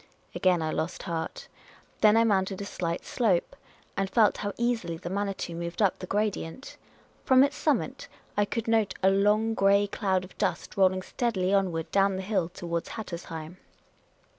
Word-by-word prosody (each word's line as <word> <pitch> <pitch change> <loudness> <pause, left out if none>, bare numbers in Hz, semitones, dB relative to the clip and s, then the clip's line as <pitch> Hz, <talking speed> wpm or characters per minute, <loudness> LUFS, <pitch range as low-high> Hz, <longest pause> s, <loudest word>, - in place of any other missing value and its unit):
Again 180 -3 +2
I 155 - -1
lost 160 +3 -3
heart. 165 -3 -4 0.5
Then 215 +1 +6
I 230 - +5
mounted 195 -3 +1
a 200 - -4
slight 170 -4 -3
slope, 210 -9 +1 0.4
and 195 -1 -1
felt 215 +1 +4
how 205 - -3
easily 230 -9 -1
the 175 +2 -6
Manitou 195 -3 -2
moved 170 +1 -5
up 200 -4 +2
the 185 - -7
gradient. 210 +2 -2 0.5
From 260 -1 +6
its 285 +1 +1
summit 300 -1 -1 0.3
I 205 - +3
could 230 +2 -3
note 220 -4 +2
a 190 - +6
long 210 +3 +3
grey 200 -1 +4
cloud 190 -2 0
of 185 - -13
dust - - -2
rolling 185 -1 +3
steadily 195 -6 -1
onward 180 -5 0
down 195 0 +3
the 190 - -4
hill 190 -4 0
towards 170 -1 -4
Hattersheim. 170 -5 -7
195 Hz, 165 wpm, -28 LUFS, 175-215 Hz, 0.5 s, Then